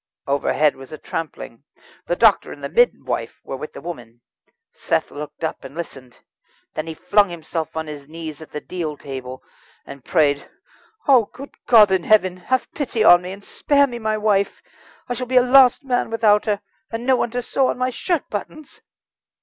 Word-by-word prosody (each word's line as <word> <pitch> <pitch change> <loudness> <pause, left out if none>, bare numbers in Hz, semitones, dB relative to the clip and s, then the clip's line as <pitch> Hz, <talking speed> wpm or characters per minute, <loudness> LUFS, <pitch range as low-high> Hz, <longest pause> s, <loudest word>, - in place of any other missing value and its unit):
Overhead 145 +1 +1
was 135 0 -13
a 155 - -7
trampling. 145 -7 -6 0.4
The - - +1
doctor - - +4
and - - -11
the - - -3
midwife 485 +1 0
were - - -5
with 150 +3 -8
the - - -9
woman. 120 -9 -9 0.5
Seth - - -1
looked 150 +3 -8
up, 160 - -3
and - - -10
listened. 135 -7 -8 0.6
Then 155 - -4
he 160 - -5
flung 185 +4 +3
himself 165 -1 -5
on 160 - -2
his 145 -2 -9
knees 160 -2 -7
at 160 - -11
the 150 - -5
deal 160 -5 -5
table, 130 -2 -8 0.4
and 140 -2 -11
prayed: 145 -3 +1 0.6
"Oh, 255 -6 +6
good 275 +6 -12
God 215 -5 +7
in 190 -2 +2
heaven! 185 -3 +3
have 255 +8 -2
pity 250 -6 -1
on 175 -4 +8
me, 180 +1 -7
and 200 +1 -10
spare 285 +5 +2
me 240 -3 -6
my 215 -1 -1
wife. 205 -2 0 0.4
I 245 - -2
shall 250 +1 -4
be 255 +1 +2
a 250 - +7
lost 255 +1 +6
man 250 -3 0
without 215 -2 +3
her 205 -1 0 0.3
and 230 +1 -5
no 260 0 +4
one 240 - 0
to 245 +1 -3
sew 265 +2 +1
on - - -1
my 255 0 0
shirt 330 +4 -2
buttons!" 285 +8 -7
185 Hz, 190 wpm, -21 LUFS, 155-245 Hz, 0.6 s, on